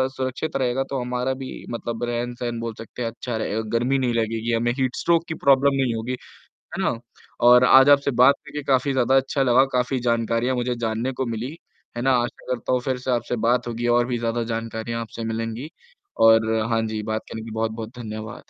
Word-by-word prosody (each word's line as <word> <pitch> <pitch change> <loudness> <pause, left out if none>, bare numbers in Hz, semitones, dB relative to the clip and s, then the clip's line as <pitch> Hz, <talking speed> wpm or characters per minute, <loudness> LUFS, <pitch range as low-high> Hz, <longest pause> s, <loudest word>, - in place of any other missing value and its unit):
सुरक्षित 130 +4 -3
रहेगा 130 0 0
तो 135 - -2
हमारा 125 +1 -1
भी 130 0 -7 0.2
मतलब 115 0 -4
रहन-सहन 120 0 -3
बोल 115 0 -4
सकते 115 +2 -9
हैं 115 - -1
अच्छा 120 0 -5
रहेगा, 110 0 -2 0.2
गर्मी 130 +4 +1
नहीं 125 -2 0
लगेगी, 115 0 -1
हमें 120 +1 +1
हीट 130 -1 0
स्ट्रोक 170 -1 +2
की 160 - -3
प्रॉब्लम 140 0 +5
नहीं 125 -3 +1
होगी। 115 +3 -3 0.6
है - - -2
ना? - - +1 0.5
और 125 +1 +7
आज 135 +2 +7
आपसे 140 0 +5
बात 140 +2 +7
करके 150 0 -6
काफ़ी 135 0 +2
ज़्यादा 130 0 +2
अच्छा 135 +1 +1
लगा, 130 +1 +5
काफ़ी 125 +1 0
जानकारियाँ 115 +2 +1
मुझे 125 0 -1
जानने 115 +2 -2
को - - +1
मिली। 120 +6 -4 0.4
है - - -2
ना? 135 +2 +3
आशा 120 -1 -1
करता 125 - -4
हूँ 125 - +2
फ़िर 130 0 -1
से 130 - -2
आपसे 120 0 -1
बात 120 0 +2
होगी 120 +1 -2
और 120 - +3
भी 125 -1 -1
ज़्यादा 115 0 -1
जानकारियाँ 115 +1 -4
आपसे 115 0 -7
मिलेंगी। 115 +4 -4 0.5
और 110 0 +5 0.2
हाँ 115 -1 +2
जी, 110 -1 -3
बात 110 +1 -2
करने 110 - -6
की 110 0 -8
बहुत-बहुत 110 +1 -4
धन्यवाद। 110 -1 -7
120 Hz, 205 wpm, -23 LUFS, 115-130 Hz, 0.6 s, और